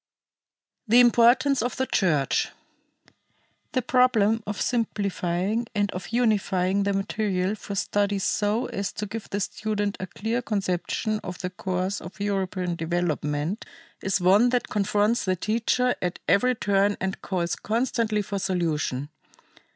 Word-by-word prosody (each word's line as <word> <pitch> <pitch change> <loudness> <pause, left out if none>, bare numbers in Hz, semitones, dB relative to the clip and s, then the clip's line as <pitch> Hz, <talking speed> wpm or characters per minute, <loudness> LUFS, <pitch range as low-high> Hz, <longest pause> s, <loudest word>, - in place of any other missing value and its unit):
The 235 +3 +6
Importance 245 +3 +5
of 245 +2 -2
the 260 - +1
Church. 155 - +1 1.2
The 255 - +1
problem 230 -4 +3
of 210 - -3
simplifying 205 -2 -1
and 205 -1 +1
of 180 0 -6
unifying 200 -5 +1
the 200 0 +1
material 195 -1 -1
for 200 -1 -6
study 200 +1 0
so 205 +4 0
as 200 0 -3
to 210 - -4
give 215 +1 -7
the 200 - -2
student 205 0 -2
a 185 - -4
clear 225 +6 -2
conception 210 0 -1
of 180 -3 -7
the 180 -1 -4
course 185 +1 -2
of 180 +5 -10
European 190 -3 -1
development 165 +1 -1 0.4
is 195 0 +1
one 195 +7 +5
that 245 0 0
confronts 210 +3 +1
the 185 -1 +1
teacher 230 +5 +1
at 180 -1 -2
every 250 +8 +3
turn 200 -1 +2
and 190 +1 -3
calls 175 -2 -1
constantly 225 -2 0
for 200 0 -3
solution. 160 -7 -1
200 Hz, 135 wpm, -25 LUFS, 185-225 Hz, 1.2 s, The